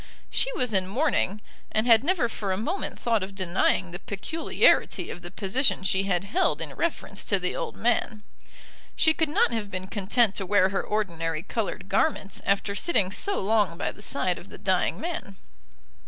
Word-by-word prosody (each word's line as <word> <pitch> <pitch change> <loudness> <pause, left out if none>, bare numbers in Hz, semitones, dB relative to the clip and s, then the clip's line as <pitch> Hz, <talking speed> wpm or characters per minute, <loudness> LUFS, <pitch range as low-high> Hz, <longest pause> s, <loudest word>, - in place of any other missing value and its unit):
She - - +2
was 250 - 0
in 190 -1 +4
mourning, 215 -3 0 0.3
and 215 +1 +1
had 230 -1 +6
never 330 -6 +2
for 205 -3 -4
a 185 - 0
moment 310 - -3
thought 230 -3 +1
of 195 +1 -5
denying 185 -1 +1
the 175 - -6
peculiarity 240 - +1
of 175 - -8
the 175 - -7
position 210 +4 0
she 190 0 +1
had 180 -2 0
held 355 - +1
in - - -4
reference 295 -11 -3
to 200 - +2
the 180 -1 -2
old - - -4
man. 225 -2 0 0.7
She 320 - +4
could 320 -1 0
not 295 - +3
have 220 -3 -3
been 185 -1 -5
content 205 +2 +1
to 195 - -2
wear 195 -1 +4
her 195 - -1
ordinary 165 -6 -2
coloured - - -3
garments 250 -10 0
after 200 0 +1
sitting 200 - +1
so 395 - 0
long 205 -4 +1
by - - -2
the - - -15
side - - -1
of - - -14
the - - -10
dying - - 0
man. 330 - -5
205 Hz, 185 wpm, -26 LUFS, 190-245 Hz, 0.7 s, had